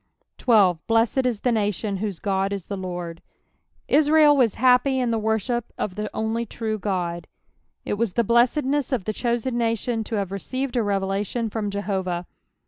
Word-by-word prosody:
12. 195 -8 +4
" - - -51
Binned 230 +3 +3
i* - - +3
the 245 - +2
nation 205 -2 -1
whote 200 -3 -4
God 195 -1 0
ie - - -1
the 200 +2 -6
Lord." 175 -3 -5 0.7
Israel 300 0 +5
was 245 -6 +3
happy 255 +2 +4
in 245 -2 0
the 225 - 0
worship 220 +2 -1
of 190 - -2
the 210 +2 -4
only 220 +1 -1
true 220 -1 -4
God. 175 -3 -2 0.6
It 205 - -2
was 230 -5 0
the 235 - +2
blessedness 260 +5 +2
of 255 -7 0
the 215 - -2
chosen 240 +1 -1
nation 230 0 0
to 225 - -3
have 200 -3 -2
received 255 +7 -3
a 240 - +3
revelation 200 +2 -1
from 210 -2 -2
JehoTah. 190 -3 -2
220 Hz, 175 wpm, -24 LUFS, 195-240 Hz, 0.7 s, Israel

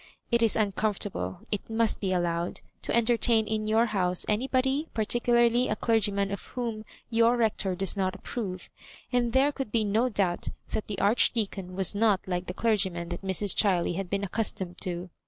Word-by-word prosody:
It 235 0 +3
is 225 -2 +4
uncomfortable, 205 -2 -1
it 205 0 -3
must 225 0 +1
be 190 -2 -1
allowed, 175 -1 -1 0.2
to - - -1
entertain 235 -1 +3
in 215 0 -2
your 220 +2 +3
house 180 -5 0
anybo<iy, 265 +6 0
particularly 240 +2 +2
a 215 - 0
clergyman 205 -3 +1
of 200 - -4
whom 230 -3 -4 0.3
your 230 +1 +4
Rector 210 -5 +1
does 195 +2 0
not 190 -2 -1
approve; 185 -7 -6 0.4
and 240 -1 +2
there 270 +4 +3
could 270 -6 -5
be 225 -2 +2
no 220 +5 +1
doubt 195 -5 -1 0.2
that 215 - -3
the 205 - -4
Archdeacon 200 -3 +1
was 190 -1 +1
not 205 -3 +2
like 180 0 -2
the 180 - -4
clergymen 190 -7 0
that 175 - -5
Mrs. 195 +1 +1
Chiley 180 -4 +2
had 190 -1 -4
been 200 0 -1
accustomed 190 -3 -2
to. 180 0 -4
210 Hz, 175 wpm, -28 LUFS, 190-230 Hz, 0.4 s, is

